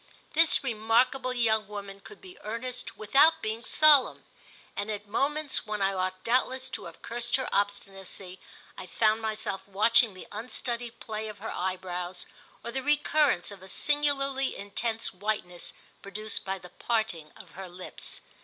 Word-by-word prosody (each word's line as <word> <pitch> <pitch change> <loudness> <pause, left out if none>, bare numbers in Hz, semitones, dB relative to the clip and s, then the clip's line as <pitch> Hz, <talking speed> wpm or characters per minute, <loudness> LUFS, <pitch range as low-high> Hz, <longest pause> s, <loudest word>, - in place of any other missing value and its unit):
This 320 -1 +5
remarkable 245 +2 +2
young 220 -4 +2
woman 200 -1 -7
could 415 - -14
be 370 -1 -12
earnest 235 +4 -5
without 285 +9 +5
being 220 -1 -3
solemn, 300 -4 +5 0.5
and 205 +1 -3
at 210 -1 -4
moments 285 +4 0
when 210 0 -2
I 195 0 +2
ought 185 0 -2
doubtless 260 +2 +1
to - - -5
have - - -11
cursed 240 +1 -1
her 260 -1 0
obstinacy 195 -2 -2 0.4
I - - -8
found 220 0 +2
myself 215 -3 -2
watching 215 +2 +5
the 185 - -9
unstudied 235 +1 -4
play 220 -3 -5
of 210 -1 -7
her 220 +2 -6
eyebrows 180 -1 -3 0.4
or 235 - -3
the 265 +2 0
recurrence 295 -7 +3
of 200 -2 -11
a 190 - -11
singularly 275 0 +1
intense 220 +3 -2
whiteness 185 -3 -3 0.3
produced 215 +2 -3
by 195 0 -2
the 180 -1 -12
parting 205 -11 -2
of - - -13
her 190 0 -8
lips. 180 +1 -7
220 Hz, 155 wpm, -28 LUFS, 195-255 Hz, 0.5 s, This